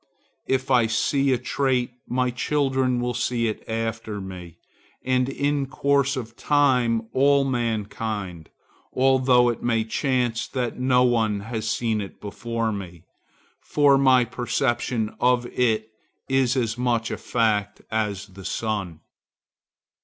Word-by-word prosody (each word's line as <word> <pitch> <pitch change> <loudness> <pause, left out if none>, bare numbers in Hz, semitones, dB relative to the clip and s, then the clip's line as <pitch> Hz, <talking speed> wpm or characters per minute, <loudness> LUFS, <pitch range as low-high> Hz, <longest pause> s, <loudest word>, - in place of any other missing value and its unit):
If 130 0 0
I 120 -3 +4
see 135 +5 +1
a 130 - +3
trait, 125 0 0 0.2
my 125 0 0
children 130 -1 0
will 125 0 -1
see 120 0 0
it 110 - -4
after 115 -1 -3
me, 90 -3 -9 0.5
and 130 0 +1
in 140 0 -1
course 140 +1 +1
of 115 -2 -6
time 125 -7 +2
all 140 +1 +4
mankind,—although 120 +2 0
it 120 - -3
may 115 -2 +1
chance 120 0 -1
that 125 -3 -3
no 125 -1 +3
one 110 -4 +1
has 110 0 -4
seen 110 -1 0
it 100 - -9
before 115 +2 -3
me. 90 -5 -7 0.6
For 145 -2 +3
my 130 -2 +5
perception 120 -1 -1
of 125 0 +3
it 110 -3 0 0.4
is 135 -1 +2
as 120 -1 -1
much 120 -2 0
a - - -3
fact 105 -3 0
as 105 -3 -1
the 95 -1 -13
sun. 100 -7 -3
120 Hz, 130 wpm, -24 LUFS, 110-130 Hz, 0.6 s, my